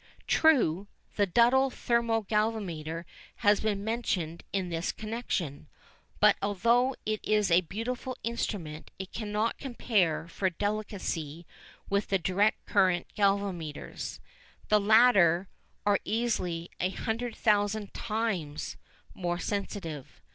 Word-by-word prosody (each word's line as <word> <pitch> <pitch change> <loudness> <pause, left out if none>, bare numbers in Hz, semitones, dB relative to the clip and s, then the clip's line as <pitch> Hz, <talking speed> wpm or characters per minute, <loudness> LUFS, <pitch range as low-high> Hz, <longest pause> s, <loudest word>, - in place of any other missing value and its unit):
True, 205 - +3 0.3
the 205 -1 +2
Duddell 245 +7 +4
thermo 235 -2 +1
galvanometer 190 -7 -1 0.4
has 205 0 +6
been 205 -2 -1
mentioned 190 -8 -2
in 190 -2 -1
this 165 +1 -1
connection, 215 - -4 0.5
but - - +6
although 235 +6 +2
it 215 0 -1
is 210 -3 +2
a 170 +2 +6
beautiful 235 +8 -4
instrument 190 -9 -3
it 190 0 -7
cannot 215 +1 -1
compare 205 - 0
for 190 +3 -1
delicacy 185 -5 -3 0.4
with 200 0 0
the 195 - +2
direct 195 +4 +1
current 185 -3 +2
galvanometers. 195 -7 -1 0.5
The 210 - +5
latter 200 -5 +5 0.4
are 205 -1 +4
easily 185 -7 -1
a 185 - +1
hundred 230 +4 -3
thousand 205 -1 +1
times 205 -10 -3 0.4
more 175 -2 -2
sensitive. 180 - -4
205 Hz, 110 wpm, -29 LUFS, 175-225 Hz, 0.5 s, has